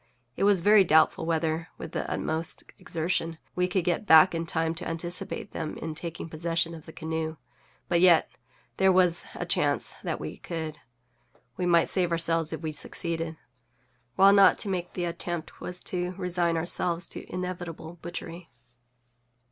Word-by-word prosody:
It - - +1
was 200 -3 +4
very 205 +2 +7
doubtful 160 -1 +3
whether, 160 0 0
with - - -7
the - - -3
utmost 160 +1 -3 0.2
exertion, 165 0 -2 0.2
we 180 0 +2
could 180 0 0
get 180 +4 -1
back 160 +3 +8
in 165 0 -2
time 160 0 0
to 165 - -6
anticipate 170 +4 -3
them 155 - -4
in 160 -1 -5
taking 165 +1 -6
possession 165 +1 -1
of 160 -1 -11
the - - -8
canoe; 160 0 -4 0.5
but 170 -1 +2
yet 175 -3 +6 0.5
there 190 0 +5
was 180 -2 +3
a - - -4
chance - - +1
that - - -3
we - - -6
could. 160 -3 -5 0.8
We 180 - -1
might 170 -1 +4
save 180 -3 +2
ourselves 165 -1 +1
if 160 -2 -5
we 160 -2 -3
succeeded, 165 +1 -3 0.8
while 195 +1 +7
not 200 -2 +7
to 205 - -3
make 180 -2 -3
the 175 - -2
attempt 170 -1 -4
was 180 0 -5
to 180 0 -3
resign 175 -2 0
ourselves 170 +1 -1
to - - -8
inevitable 175 -2 -5
butchery. 170 0 -7
170 Hz, 165 wpm, -27 LUFS, 160-180 Hz, 0.8 s, back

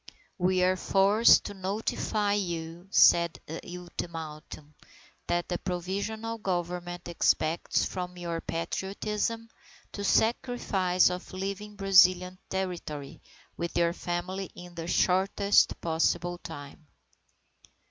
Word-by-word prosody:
"We 185 0 +2
are 185 +1 +3
forced 200 +5 +5
to - - -6
notify 205 +1 -1
you," 170 -3 -3
said 170 -3 +5
the 160 +2 -6 0.2
ultimatum, 155 -4 -8 0.5
"that 175 0 0
the 175 - -2
Provisional 200 +5 -3
Government 175 -2 -3
expects 165 -1 +1
from 180 -1 -5
your 170 -1 -4
Patriotism 210 +6 -3 0.4
the 200 - -5
sacrifice 200 -6 +2
of 180 +1 -6
leaving 200 +2 -5
Brazilian 185 -2 +4
territory 175 -7 -4 0.3
with 170 0 -4
your 170 0 +3
family 180 +2 -4
in 175 0 -11
the 165 -1 -6
shortest 195 +3 +3
possible 170 +2 0
time." 145 -1 -10
180 Hz, 105 wpm, -28 LUFS, 170-195 Hz, 0.5 s, forced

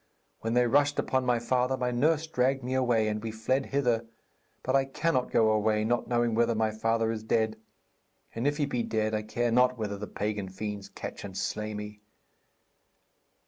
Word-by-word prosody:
When 115 +1 -2
they 125 0 +5
rushed 145 +3 +3
upon 130 -1 0
my 120 -1 +3
father, 125 +2 +1
my 125 -1 -1
nurse 155 +6 +2
dragged 135 -3 0
me 125 +1 -3
away, 120 -4 +2
and 105 0 -2
we 115 - -4
fled 130 +5 -1
hither. 120 -5 +1 0.6
But 130 - +1
I 135 - +5
cannot 135 -1 0
go 110 -1 +4
away, 110 0 +2
not 120 +2 0
knowing 120 -2 +1
whether 115 +1 +2
my 110 0 +1
father 115 +1 0
is 110 -1 -4
dead. 110 0 +1 0.8
And 115 +4 -1
if 145 0 +1
he 150 - +1
be 125 -4 -1
dead 110 -1 -1
I 105 - 0
care 120 +2 -1
not 125 +1 +4
whether 105 -3 -3
the 105 - -5
pagan 105 -2 -3
fiends 100 +1 -5
catch - - -7
and 95 -2 -7
slay 105 0 -3
me.' 105 0 -7
115 Hz, 190 wpm, -29 LUFS, 110-130 Hz, 0.8 s, they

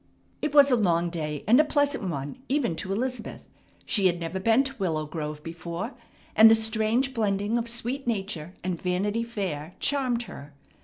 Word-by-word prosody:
It 300 - -1
was 285 -1 +6
a - - +6
long 175 -6 +1
day 150 -3 -4
and 240 +5 +6
a - - +7
pleasant 285 -5 0
one 145 - -5
even 260 - +1
to 190 - -4
Elizabeth. 245 +3 -3 0.4
She 200 -4 +3
had 175 -1 0
never 170 +3 -4
been 225 +6 +4
to 275 0 -4
Willow 160 -5 -1
Grove 150 -1 -5
before, 170 - -5 0.4
and 220 +1 +9
the 225 - +7
strange 220 +4 +1
blending 205 -1 0
of 235 0 -1
sweet 240 +3 -2
nature 190 -6 -3
and 180 -2 -3
Vanity 200 +5 0
Fair 185 -9 -4
charmed 255 -4 0
her. 145 -10 -11
210 Hz, 175 wpm, -26 LUFS, 170-240 Hz, 0.4 s, and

